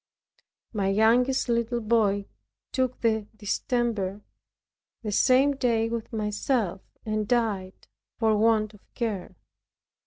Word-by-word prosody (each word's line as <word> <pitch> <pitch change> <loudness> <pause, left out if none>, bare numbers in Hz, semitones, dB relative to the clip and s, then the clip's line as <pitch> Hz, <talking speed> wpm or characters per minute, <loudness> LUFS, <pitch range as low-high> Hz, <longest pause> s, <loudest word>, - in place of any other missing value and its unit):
My 200 -3 0
youngest 235 +7 +3
little 235 0 0
boy 210 -3 +2 0.5
took 255 -1 -1
the 220 -2 +1
distemper 210 -2 -1 0.8
the 210 - -2
same 270 +6 +4
day 230 -4 +1
with 230 -1 -4
myself, 210 -2 -1 0.2
and 215 -1 -1
died 215 -6 -1 0.3
for 220 -2 +3
want 215 0 +2
of 210 - -16 0.2
care. 215 -7 -3
220 Hz, 105 wpm, -26 LUFS, 210-240 Hz, 0.8 s, same